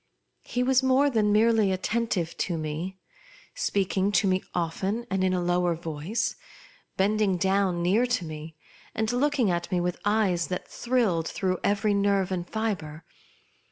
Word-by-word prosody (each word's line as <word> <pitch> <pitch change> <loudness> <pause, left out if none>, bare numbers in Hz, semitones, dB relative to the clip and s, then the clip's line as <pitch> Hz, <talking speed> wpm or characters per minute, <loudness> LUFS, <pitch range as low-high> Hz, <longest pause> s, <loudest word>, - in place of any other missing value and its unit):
He 250 - -2
was 260 0 +3
more 265 +2 +3
than 215 -3 +2
merely 220 -1 +4
attentive 190 -3 -1
to 175 -3 -1
me; 160 +5 -4 0.6
speaking 200 - 0
to 200 - +3
me 185 0 +2
often 190 +7 -2
and 190 0 +1
in 185 - +2
a 185 - +1
lower 175 -1 +1
voice, 165 +8 -3 0.6
bending 200 -1 +2
down 190 -1 +1
near 210 +8 +3
to 245 -8 -1
me, 155 0 -8 0.4
and 220 +1 0
looking 250 -4 +2
at 175 +2 -2
me 180 - +1
with 175 0 -2
eyes 200 -5 +1
that 180 - -4
thrilled 225 -10 0
through 185 -2 -1
every 205 +1 +2
nerve 200 -2 +1
and 175 -2 -3
fibre. 175 -8 -3
190 Hz, 155 wpm, -27 LUFS, 175-220 Hz, 0.6 s, merely